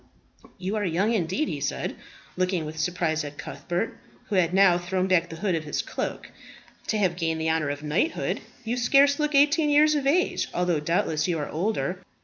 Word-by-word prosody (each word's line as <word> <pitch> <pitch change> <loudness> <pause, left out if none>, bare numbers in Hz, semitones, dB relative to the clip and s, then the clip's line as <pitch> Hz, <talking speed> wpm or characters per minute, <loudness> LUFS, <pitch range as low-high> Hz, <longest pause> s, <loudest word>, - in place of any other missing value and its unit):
You 190 +3 -3
are 210 - -1
young 190 +5 +1
indeed," 195 - 0
he - - -4
said, - - -2 0.4
looking 185 -3 0
with 155 +1 -7
surprise 160 -1 0
at 145 0 -8
Cuthbert, 175 +5 -4 0.3
who 210 - -1
had 175 -2 +3
now 185 -2 +5
thrown 185 +1 -1
back 180 -2 +2
the 165 - -7
hood 190 +2 -1
of 160 -2 -1
his 150 - -2
cloak, - - -5 0.6
"to 220 - 0
have 185 -4 +1
gained 165 -2 -1
the 160 0 +1
honour 160 -2 0
of 145 +1 -4
knighthood. 160 - -1 0.2
You 235 +2 -2
scarce 275 +4 +4
look 300 -1 0
eighteen 295 +2 +4
years 300 +1 +5
of 285 -2 0
age, 350 +6 +2
although, 175 -3 +1
doubtless, 155 0 0
you 175 -2 0
are 145 - -4
older." 185 +1 -1
180 Hz, 195 wpm, -26 LUFS, 160-225 Hz, 0.6 s, now